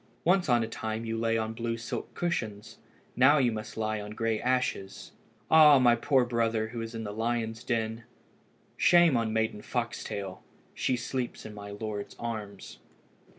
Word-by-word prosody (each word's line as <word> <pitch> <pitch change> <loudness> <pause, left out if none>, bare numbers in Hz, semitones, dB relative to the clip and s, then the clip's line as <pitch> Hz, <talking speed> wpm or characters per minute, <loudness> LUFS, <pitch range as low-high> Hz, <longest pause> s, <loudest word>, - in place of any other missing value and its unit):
Once 180 -2 +3
on 120 -1 +4
a - - -3
time 110 0 -4
you 115 0 -2
lay 115 0 +1
on 110 0 -2
blue 115 0 -3
silk 115 - -5
cushions. 110 -12 -3 0.4
Now 140 +4 +6
you 125 -4 +3
must 110 0 -6
lie 110 -1 -1
on 105 - -7
the 105 - -9
grey 115 -1 -1
ashes. 125 -6 -1 0.4
Ah! 150 -3 +8
my 120 -2 +5
poor 130 +1 +2
brother, 115 -2 0
who 115 0 -5
is 115 0 -6
in 115 - -4
the 105 -1 -5
lions' 115 0 -2
den! 115 -1 -2 0.7
Shame 175 -4 +5
on 115 -2 0
Maiden 110 -1 -1
Foxtail! 105 -6 -4 0.3
she 130 - 0
sleeps 125 +1 -4
in 110 - -8
my 100 -1 -9
lord's 105 0 -5
arms." 105 -4 -6
115 Hz, 170 wpm, -29 LUFS, 110-120 Hz, 0.7 s, Ah